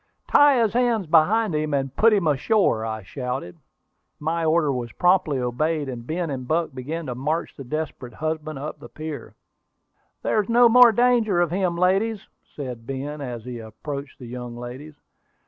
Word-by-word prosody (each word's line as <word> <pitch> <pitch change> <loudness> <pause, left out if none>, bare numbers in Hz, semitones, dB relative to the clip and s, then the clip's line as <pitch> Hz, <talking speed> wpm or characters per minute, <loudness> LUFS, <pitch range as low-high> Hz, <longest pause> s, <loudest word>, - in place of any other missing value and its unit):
"Tie 290 -3 +6
his 225 -3 +2
hands 235 -4 +1
behind 180 +6 +3
him, 150 -1 0
and 135 -1 -2
put 225 +1 +5
him 200 -5 +2
ashore!" 150 - +2
I 110 -1 -4
shouted. 125 -3 -5 0.6
My 165 +2 -1
order 160 -2 +2
was 120 -2 -4
promptly 175 -5 +2
obeyed, 145 +5 -1
and 120 -2 -7
Ben 165 -1 -2
and 130 -2 -5
Buck 160 0 0
began 150 +6 -5
to 125 - -3
march 150 +7 -2
the 135 - -8
desperate 135 -4 -5
husband 155 -1 -3
up 145 +3 -6
the - - -11
pier. 155 -1 -7 0.9
"There 215 - +2
is 205 - -9
no 240 +1 +6
more 245 0 +8
danger 230 -5 +3
of 175 -2 +1
him, 180 -2 0
ladies," 195 +4 +1 0.3
said 125 -5 -7
Ben, 145 +2 -5
as 120 -4 -6
he 125 -2 -6
approached 140 +6 -7
the 130 - -10
young 120 0 -7
ladies. 130 +5 -8
155 Hz, 175 wpm, -23 LUFS, 130-180 Hz, 0.9 s, more